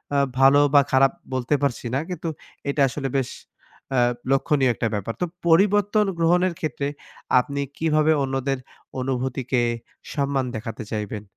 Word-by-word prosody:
আ -, -, +3 dB, 0.2 s
ভালো 135 Hz, +2 st, +7 dB
বা 145 Hz, -, +8 dB
খারাপ 135 Hz, 0 st, +5 dB, 0.2 s
বলতে 130 Hz, +3 st, +1 dB
পারছি 140 Hz, -3 st, -1 dB
না। 135 Hz, -, +2 dB
কিন্তু 175 Hz, -2 st, -4 dB, 0.4 s
এটা 140 Hz, -, 0 dB
আসলে 135 Hz, 0 st, -3 dB
বেশ 130 Hz, -2 st, -1 dB, 0.7 s
আ -, -, +5 dB, 0.3 s
লক্ষনীয় 135 Hz, -2 st, +3 dB
একটা 115 Hz, -, -1 dB
ব্যাপার। 105 Hz, +2 st, -2 dB
তো -, -, +3 dB, 0.2 s
পরিবর্তন 205 Hz, +4 st, +4 dB
গ্রহণের 175 Hz, +2 st, +3 dB
ক্ষেত্রে 140 Hz, -2 st, -2 dB, 0.5 s
আপনি 140 Hz, +2 st, -2 dB, 0.2 s
কিভাবে 155 Hz, -1 st, +2 dB
অন্যদের 135 Hz, 0 st, -1 dB, 0.4 s
অনুভূতিকে 130 Hz, -1 st, -1 dB, 0.5 s
সম্মান 140 Hz, -2 st, 0 dB
দেখাতে 110 Hz, 0 st, -5 dB
চাইবেন? 105 Hz, -1 st, -4 dB
135 Hz, 135 wpm, -23 LUFS, 125-155 Hz, 0.7 s, বা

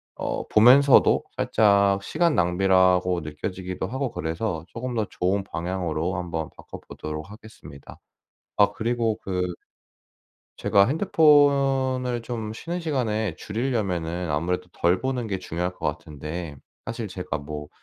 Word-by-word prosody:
어 -, -, -4 dB
보면서도 130 Hz, +5 st, +6 dB
살짝 100 Hz, -2 st, +3 dB
시간 165 Hz, -, +1 dB
낭비라고 90 Hz, 0 st, +3 dB
느껴지기도 90 Hz, +5 st, -5 dB
하고 130 Hz, +2 st, -3 dB
그래서 85 Hz, +1 st, -3 dB
조금 125 Hz, +4 st, -5 dB
더 110 Hz, -2 st, 0 dB
좋은 95 Hz, +1 st, -1 dB
방향으로 90 Hz, -1 st, -3 dB
한 90 Hz, 0 st, -4 dB
번 80 Hz, -2 st, -3 dB
바꿔 -, -, -10 dB
보도록 75 Hz, +3 st, -7 dB
하겠습니다. 105 Hz, -9 st, -13 dB, 0.6 s
아 100 Hz, 0 st, +4 dB
그리고 115 Hz, -1 st, -1 dB
그 90 Hz, -2 st, -2 dB, 1.1 s
제가 100 Hz, 0 st, +4 dB
핸드폰을 135 Hz, -, +3 dB
좀 110 Hz, -3 st, -5 dB
쉬는 170 Hz, +10 st, -5 dB
시간에 110 Hz, -, -1 dB
줄이려면은 90 Hz, -, -2 dB
아무래도 90 Hz, +4 st, -1 dB
덜 90 Hz, +2 st, +1 dB
보는 130 Hz, -3 st, -2 dB
게 100 Hz, -3 st, -2 dB
중요할 90 Hz, +1 st, -3 dB
것 -, -, -4 dB
같은데, 75 Hz, +1 st, -5 dB, 0.3 s
사실 115 Hz, -2 st, -5 dB
제가 90 Hz, -5 st, -4 dB
뭐 75 Hz, 0 st, -7 dB
100 Hz, 290 characters per minute, -25 LUFS, 90-120 Hz, 1.1 s, 보면서도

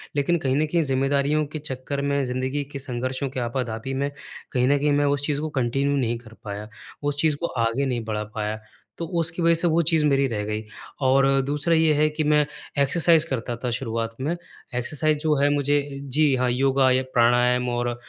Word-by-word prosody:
लेकिन 150 Hz, +4 st, +2 dB
कहीं 135 Hz, -3 st, 0 dB
न 155 Hz, -, +2 dB
कहीं 170 Hz, +2 st, +1 dB
ज़िम्मेदारियों 140 Hz, +2 st, +1 dB
के 155 Hz, -, -3 dB
चक्कर 140 Hz, 0 st, -4 dB
में, 140 Hz, 0 st, 0 dB
ज़िंदगी 130 Hz, +3 st, -2 dB
के 140 Hz, -, -4 dB
संघर्षों 130 Hz, +1 st, -3 dB
के 130 Hz, -, -5 dB
आपा-धापी 120 Hz, 0 st, -3 dB
में, 140 Hz, +2 st, -1 dB, 0.4 s
कहीं 125 Hz, -1 st, +2 dB
न 145 Hz, -, +4 dB
कहीं 145 Hz, +1 st, +1 dB
मैं -, -, +2 dB
उस 145 Hz, 0 st, 0 dB
चीज़ 145 Hz, -1 st, -1 dB
को 155 Hz, -, -2 dB
कंटिन्यू 135 Hz, +4 st, 0 dB
नहीं 120 Hz, -3 st, 0 dB
कर 115 Hz, -2 st, -15 dB
पाया, 105 Hz, +1 st, -6 dB, 0.3 s
उस 145 Hz, 0 st, 0 dB
चीज़ 155 Hz, -2 st, +2 dB
को -, -, 0 dB, 0.2 s
आगे 125 Hz, +5 st, -1 dB
नहीं 125 Hz, -3 st, -2 dB
बढ़ा 105 Hz, -1 st, -2 dB
पाया, 110 Hz, 0 st, -2 dB, 0.4 s
तो 170 Hz, -, -3 dB
उसकी 165 Hz, +1 st, 0 dB
वजह 170 Hz, 0 st, +4 dB
से 165 Hz, +2 st, +1 dB
वो 170 Hz, +1 st, +3 dB
चीज़ 160 Hz, -1 st, +2 dB
मेरी 140 Hz, -1 st, +3 dB
रह 110 Hz, -4 st, -3 dB
गई। 105 Hz, +1 st, -3 dB, 0.4 s
और 135 Hz, +1 st, +4 dB, 0.2 s
दूसरा 145 Hz, +4 st, +1 dB
ये 160 Hz, -1 st, +4 dB
है 150 Hz, +1 st, +3 dB
कि 155 Hz, +1 st, -2 dB
मैं 150 Hz, 0 st, +3 dB, 0.4 s
एक्सरसाइज 165 Hz, +2 st, +4 dB
करता 125 Hz, -5 st, -3 dB
था 125 Hz, -, 0 dB
शुरुआत 115 Hz, -2 st, -3 dB
में, 155 Hz, +6 st, -1 dB, 0.4 s
एक्सरसाइज 150 Hz, +5 st, +1 dB
जो 155 Hz, -1 st, +3 dB
है 140 Hz, +1 st, +3 dB
मुझे 145 Hz, 0 st, +2 dB, 0.3 s
जी 150 Hz, -2 st, +4 dB
हाँ, 125 Hz, 0 st, +1 dB
योगा 135 Hz, +1 st, +3 dB
या 130 Hz, +1 st, +2 dB
प्राणायाम 125 Hz, +1 st, +3 dB
और 120 Hz, 0 st, -1 dB
अ, 120 Hz, -, -2 dB
135 Hz, 210 wpm, -24 LUFS, 125-150 Hz, 0.4 s, न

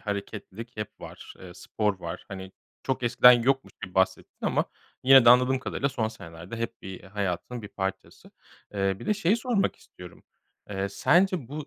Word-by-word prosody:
hareketlilik 105 Hz, +2 st, -6 dB
hep 105 Hz, -1 st, -7 dB
var, -, -, -11 dB
eee, 90 Hz, -1 st, -11 dB
spor 105 Hz, +1 st, -2 dB
var. 85 Hz, +1 st, -6 dB
Hani, 95 Hz, -1 st, -8 dB, 0.3 s
çok 130 Hz, -1 st, -2 dB
eskiden 125 Hz, +1 st, +7 dB
yokmuş 130 Hz, +3 st, +1 dB
gibi 90 Hz, -, -13 dB
bahsettin 95 Hz, 0 st, 0 dB
ama -, -, +1 dB, 0.4 s
yine 135 Hz, -1 st, +8 dB
de 120 Hz, -, +9 dB
anladığım 125 Hz, +1 st, +5 dB
kadarıyla 140 Hz, +1 st, -2 dB
son 120 Hz, -5 st, -1 dB
senelerde 85 Hz, +1 st, -10 dB
hep 115 Hz, 0 st, -5 dB
bir 95 Hz, -1 st, -8 dB
hayatının 100 Hz, +4 st, -4 dB
bir 105 Hz, -, -8 dB
parçası. 95 Hz, -1 st, -6 dB, 0.4 s
Eee, 95 Hz, -1 st, 0 dB
bir -, -, -10 dB
de 210 Hz, -, +2 dB
şeyi 205 Hz, +1 st, +2 dB
sormak 235 Hz, -4 st, 0 dB
istiyorum. 90 Hz, -1 st, -14 dB, 0.5 s
Eee, 95 Hz, 0 st, -2 dB
sence 160 Hz, -, +2 dB
bu 150 Hz, +1 st, -6 dB
110 Hz, 170 wpm, -27 LUFS, 95-130 Hz, 0.5 s, de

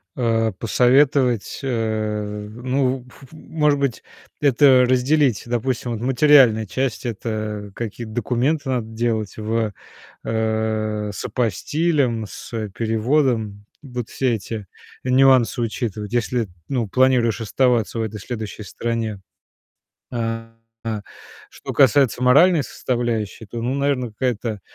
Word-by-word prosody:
Э, 115 Hz, -3 st, +1 dB
посоветовать, 125 Hz, 0 st, +2 dB
э, 110 Hz, -3 st, -2 dB
ну, 130 Hz, +2 st, -1 dB
ф 135 Hz, -, -17 dB
ф -, -, -20 dB
может 150 Hz, -2 st, 0 dB
быть, 140 Hz, -4 st, -1 dB, 0.4 s
это 130 Hz, -2 st, +5 dB
разделить. 130 Hz, -1 st, +2 dB
Допустим, 120 Hz, +1 st, -2 dB
вот 115 Hz, -1 st, -4 dB
материальная 130 Hz, -4 st, +5 dB
часть- 130 Hz, +3 st, -2 dB
это 110 Hz, -2 st, -4 dB
какие-то 115 Hz, 0 st, -6 dB
документы 130 Hz, +5 st, 0 dB
надо 120 Hz, -4 st, -1 dB
делать 110 Hz, -2 st, -2 dB
в 110 Hz, 0 st, -1 dB, 0.5 s
э, 110 Hz, -1 st, -1 dB
с -, -, -6 dB
апостилем, 125 Hz, -, 0 dB
с 110 Hz, -1 st, -6 dB
переводом. 110 Hz, -1 st, 0 dB, 0.2 s
Вот 125 Hz, -4 st, -6 dB
все 130 Hz, -3 st, 0 dB
эти 105 Hz, -1 st, -6 dB, 0.4 s
нюансы 130 Hz, -2 st, +4 dB
учитывать, 110 Hz, -2 st, -3 dB
если, 120 Hz, -2 st, 0 dB, 0.2 s
ну, 120 Hz, -5 st, -1 dB
планируешь 125 Hz, -2 st, +3 dB
оставаться 115 Hz, 0 st, +1 dB
в -, -, 0 dB
этой 110 Hz, -1 st, -5 dB
следующей 110 Hz, -1 st, -6 dB
стране. 110 Hz, 0 st, -3 dB, 0.9 s
А 115 Hz, -1 st, -3 dB, 1.0 s
что -, -, -7 dB
касается 135 Hz, -3 st, +4 dB
моральной 150 Hz, +5 st, +5 dB
составляющей, 115 Hz, -5 st, -3 dB
то, 115 Hz, +3 st, -6 dB
ну, 125 Hz, +3 st, -1 dB
наверное, 140 Hz, -4 st, 0 dB
какая-то, 115 Hz, -3 st, -2 dB
120 Hz, 115 wpm, -21 LUFS, 110-130 Hz, 1.0 s, это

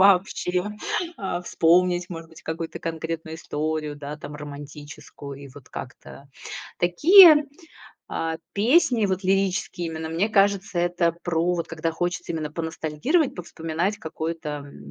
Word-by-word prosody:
вообще, 185 Hz, -1 st, +3 dB, 0.5 s
а, 180 Hz, -3 st, -3 dB
вспомнить, 175 Hz, +1 st, +3 dB
может 165 Hz, -2 st, -8 dB
быть, 160 Hz, -, -15 dB
какую-то 165 Hz, 0 st, -4 dB
конкретную 160 Hz, 0 st, -4 dB
историю, 155 Hz, -1 st, -3 dB
да, 145 Hz, +1 st, -6 dB
там, 150 Hz, -1 st, -9 dB
романтическую. 145 Hz, -1 st, -9 dB
И 140 Hz, -, -10 dB
вот 140 Hz, -3 st, -13 dB
как-то 135 Hz, +2 st, -9 dB, 0.5 s
Такие, 305 Hz, -, +8 dB, 0.6 s
а, 160 Hz, 0 st, -2 dB, 0.2 s
песни, 235 Hz, 0 st, +4 dB
вот 190 Hz, 0 st, -1 dB
лирические 185 Hz, -2 st, 0 dB
именно, 160 Hz, 0 st, -5 dB
мне 170 Hz, +7 st, 0 dB
кажется, 200 Hz, -2 st, +2 dB
это 175 Hz, -1 st, +2 dB
про, 175 Hz, +1 st, +1 dB
вот 170 Hz, -, -3 dB
когда 165 Hz, 0 st, -2 dB
хочется 175 Hz, +1 st, -2 dB
именно 155 Hz, -2 st, -3 dB
поностальгировать, 165 Hz, -, 0 dB
повспоминать 170 Hz, +3 st, -3 dB
какой-то, 160 Hz, 0 st, -4 dB, 0.2 s
м, 70 Hz, -, -12 dB
165 Hz, 130 wpm, -24 LUFS, 155-185 Hz, 0.6 s, Такие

